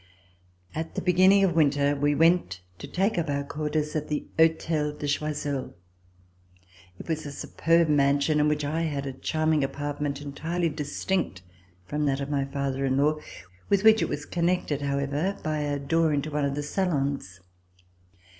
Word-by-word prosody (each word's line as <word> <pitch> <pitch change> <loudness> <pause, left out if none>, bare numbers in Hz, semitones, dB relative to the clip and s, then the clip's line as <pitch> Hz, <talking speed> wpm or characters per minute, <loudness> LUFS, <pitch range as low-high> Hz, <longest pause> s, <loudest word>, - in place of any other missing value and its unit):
At 160 +1 -5
the - - -1
beginning 185 +2 +5
of 185 -3 +3
winter 145 -2 +3
we 145 +1 +1
went 165 - +2 0.2
to - - -7
take 190 +5 0
up 160 -2 -2
our 140 0 0
quarters 150 +1 -2
at 150 -1 -2
the 150 - -2
Hotel 160 -2 +2
de 150 0 -5
Choiseul. 145 - -2 1.2
It - - -10
was 160 -2 -2
a - - -6
superb 165 +4 +1
mansion, 145 +1 +3
in 150 - +3
which 150 -1 0
I 155 +3 -1
had 145 -4 -2
a 135 - -4
charming 155 +2 0
apart 145 +1 -4
ment 140 -1 -1
entirely 165 +4 -2
distinct 150 - -2 0.4
from 150 +5 -2
that 135 -1 +1
of 140 +1 -4
my 140 -1 0
father 135 -1 -2
in 135 -1 +1
law, 150 +2 +2 0.5
with 200 -1 +3
which 220 0 +6
it - - 0
was 145 0 -4
connected, 170 -4 0
however, 140 +6 -1
by 155 -1 -1
a 145 -1 -1
door 160 +3 +1
into 145 +1 -1
one 150 -1 0
of 140 0 -1
the 145 - -3
salons. 140 - -2
150 Hz, 175 wpm, -26 LUFS, 140-160 Hz, 1.2 s, which